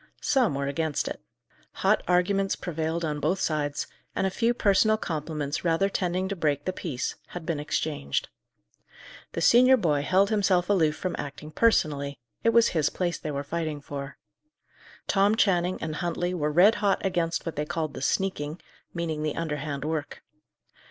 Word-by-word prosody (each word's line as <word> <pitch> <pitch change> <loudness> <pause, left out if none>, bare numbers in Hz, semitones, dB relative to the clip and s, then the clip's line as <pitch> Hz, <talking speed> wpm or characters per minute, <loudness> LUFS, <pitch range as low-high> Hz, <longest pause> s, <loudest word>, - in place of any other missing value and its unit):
Some 255 - +2
were 140 0 -1
against 145 +1 -1
it. - - -5 0.6
Hot - - +4
arguments 195 +2 +2
prevailed 165 -1 -2
on 150 -1 -2
both 165 +6 0
sides, 145 -4 -1 0.3
and - - +1
a 190 - 0
few 230 +4 +2
personal 215 +1 +3
compliments 150 -5 -3
rather 170 +3 +2
tending 185 -1 -1
to 200 - -3
break 145 -4 0
the 185 - -1
peace, 145 -9 -3
had 175 -2 -8
been 160 -3 -1
exchanged. 145 - -2 1.1
The 165 - -3
senior 255 +7 +6
boy 150 - +1
held 190 +7 +3
himself 195 -3 +2
aloof 160 -6 +3
from 185 -2 -3
acting 150 +2 -7
personally: 145 -9 +1 0.3
it 230 - +4
was 230 0 +5
his 155 -3 +1
place 175 -2 -2
they 155 - -5
were 140 -1 -3
fighting 155 0 -3
for. 140 0 -7 0.9
Tom 200 +2 +3
Channing 185 -4 +2
and 155 -2 -3
Huntley 175 +2 -1
were 150 -4 -1
red 180 +8 +6
hot 200 -1 +1
against 175 -3 0
what 165 - -4
they 150 - -1
called 160 -3 -2
the - - -7
"sneaking," 155 -1 -1 0.4
meaning 165 -3 -2
the 155 -1 -1
underhand 150 -3 -3
work. 155 -1 -4
165 Hz, 165 wpm, -27 LUFS, 150-190 Hz, 1.1 s, senior